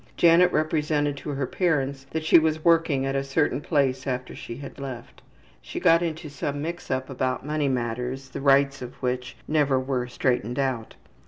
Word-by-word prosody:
Janet 175 +1 +6
represented 150 -2 +1
to 145 - -7
her 140 -2 -1
parents 140 -4 -1
that 160 0 -3
she 165 - +7
was 155 0 -1
working 165 -5 +3
at 135 0 -1
a 135 - 0
certain 140 +1 0
place 135 -4 0
after 125 -1 -3
she 115 - -7
had 140 0 -9
left. 130 -4 -8 0.4
She - - -6
got 165 +1 +5
into 165 -1 -3
some 145 0 -4
mix 170 +4 -5
up 130 0 -1
about 130 -1 -2
money 150 -1 0
matters, 125 +2 -3
the 130 - -6
rights 140 0 +3
of 125 0 -7
which 125 0 -3
never 145 -4 +2
were 130 -1 -2
straightened 125 -2 -1
out. 130 -5 -2
140 Hz, 180 wpm, -25 LUFS, 130-155 Hz, 0.4 s, she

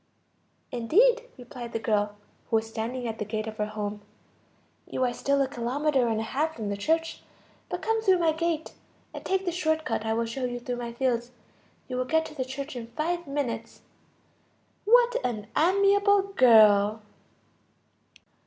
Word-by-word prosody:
"Indeed," 455 - +3
replied 245 -1 -9
the - - 0
girl, 210 -2 0 0.3
who - - +1
was 220 0 +1
standing 235 +3 -4
at 225 -1 -5
the - - -1
gate 215 +1 -3
of 220 -1 -7
her 210 - -1
home, 210 -1 -5 0.9
"you 260 - -2
are 245 - -1
still 275 +3 0
a - - -1
kilometer 260 +2 0
and 220 -1 0
a - - -2
half 310 +8 -1
from 215 -3 -4
the 200 - -1
church. 325 +11 -1 0.5
But - - -4
come 450 0 +1
through 380 -4 +4
my 335 -2 +3
gate, 320 0 -2 0.4
and - - -8
take 385 0 0
the 350 - 0
short 315 -2 0
cut - - -1
I 220 0 0
will 230 0 0
show 250 +3 -3
you 245 0 -3
through 245 0 -4
my 240 -1 -5
fields. 240 -1 -1 0.6
You 255 - -4
will 255 - 0
get 320 +4 +1
to - - -9
the 270 -4 -2
church 275 +2 -6
in 235 -2 -6
five 345 +1 -1
minutes." 240 -5 -4 1.0
What 485 +2 +5
an 215 -4 -2
amiable 395 +3 +4
girl! 215 - +6
255 Hz, 175 wpm, -27 LUFS, 225-320 Hz, 1.0 s, girl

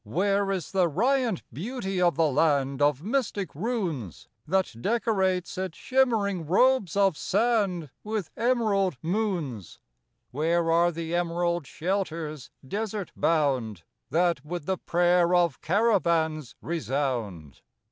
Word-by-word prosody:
Where 195 - 0
is 190 -4 -3
the 185 -3 +3
riant 235 - +1
beauty 195 - -3
of 175 -1 +3
the 165 - +3
land 140 -2 +1
Of 145 0 +2
mystic 210 - -1
runes 170 - -3 0.2
That 190 0 +1
decorates 190 - 0
its 185 -3 -4
shimmering 215 - +1
robes 205 0 +3
of 195 -4 +3
sand 195 - 0
With 215 -4 -3
emerald 215 - +1
moons? 170 - -2 0.5
Where 165 +4 +1
are 170 +1 +4
the 165 0 -5
emerald 175 -2 0
shelters, 165 -6 -3 0.2
desert 210 +1 -3
bound, 130 - 0 0.3
That 170 -2 +1
with 165 0 -5
the 190 0 -1
prayer 175 0 +3
of 170 -5 +2
caravans 170 - +1
resound? 125 - -3
175 Hz, 115 wpm, -27 LUFS, 155-200 Hz, 0.5 s, are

